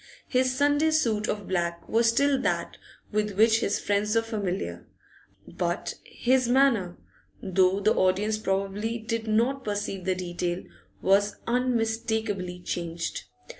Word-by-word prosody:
His 255 0 +1
Sunday 290 +2 +3
suit 230 -9 +1
of 205 -2 -3
black 170 -2 -2
was 230 +1 +3
still 275 +3 +2
that - - -1 0.3
with 210 -1 0
which 220 +1 +5
his 205 - 0
friends 210 +2 0
were 225 - +3
familiar, 205 -4 -4 0.6
but - - -2
his 255 0 +1
manner, 240 -9 +3 0.5
though 190 0 +3
the 210 +2 +3
audience 205 +4 +1
probably 200 +3 -1
did 230 0 -3
not 240 +5 +1
perceive 205 -3 -3
the 185 -1 +1
detail, 175 0 -3 0.4
was 200 +1 +3
unmistakably 225 -6 -1
hanged. 170 -1 -4
215 Hz, 130 wpm, -27 LUFS, 190-235 Hz, 0.6 s, which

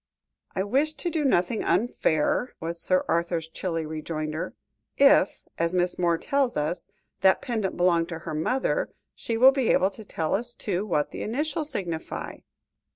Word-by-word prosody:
"I 190 - +1
wish 275 +9 +1
to 345 - -3
do 315 -2 0
nothing 220 -5 +2
unfair," 225 0 +1
was 170 +1 -5
Sir 185 0 +1
Arthur's 170 -1 0
chilly 165 -1 -3
rejoinder; 155 0 -4 0.4
"if, 275 -8 +5 0.2
as 170 +2 +1
Miss 180 0 +1
Moore 170 -2 +2
tells 275 +5 0
us, 160 +4 -2 0.3
that 190 0 +5
pendant 220 -6 -2
belonged 175 -1 +3
to 170 - -4
her - - -4
mother, 260 - 0 0.2
she 230 - -3
will 260 +3 +8
be 265 -4 0
able 190 +2 +4
to 220 - -10
tell 160 -6 -2
us, 240 +3 -1
too, 200 0 -2
what 150 -6 0
the - - -6
initials 295 +6 -2
signify." 170 - -4
185 Hz, 160 wpm, -26 LUFS, 165-245 Hz, 0.4 s, will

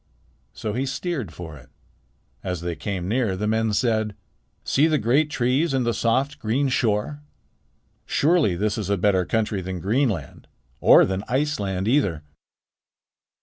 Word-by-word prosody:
So 105 - -4
he 130 +4 -1
steered 140 - -3
for 80 -3 -9
it. 65 -1 -17 0.7
As 90 -3 -3
they 85 -1 -3
came 95 -3 -4
near, 110 -3 0
the 105 - -2
men 110 +1 +1
said: 110 -1 0 0.5
"See 145 +4 +3
the 155 -2 +2
great 135 +6 +2
trees 135 +4 +1
and 130 -2 +1
the 120 - +1
soft, 130 +7 0
green 125 +6 0
shore. 120 +4 0 0.9
Surely 155 - +2
this 105 +4 -1
is 105 - -4
a 100 - +2
better 95 -1 +2
country 105 -1 -1
than 95 0 -5
Greenland 100 - -1 0.3
or - - +7
than 95 +1 -3
Iceland 105 -9 -1
either." 100 - +1
110 Hz, 145 wpm, -23 LUFS, 95-135 Hz, 0.9 s, or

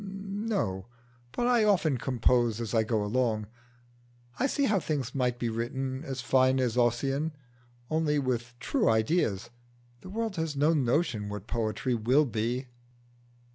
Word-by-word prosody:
"No; 195 - -3 0.4
but 240 - -1
I 240 -2 +4
often 170 - +2
compose 120 -3 +2
as 115 -3 -4
I 115 - +4
go 110 -1 0
along. 110 -1 0 0.9
I 265 - +3
see 280 +1 0
how 215 -7 +3
things 140 -7 -3
might 125 -3 0
be 120 - -2
written 130 +4 -3
as 135 -4 -4
fine 130 +1 +3
as 125 -3 0
Ossian, 135 +6 +1 0.5
only 155 0 +1
with 125 -3 -2
true - - +1
ideas. 110 - +1 0.5
The 185 - -10
world 220 -1 -3
has 160 -2 -2
no 150 +4 +3
notion 125 -6 0
what 105 -1 -6
poetry 115 +1 -1
will 125 +6 +3
be." 120 +2 -2
130 Hz, 145 wpm, -29 LUFS, 115-160 Hz, 0.9 s, I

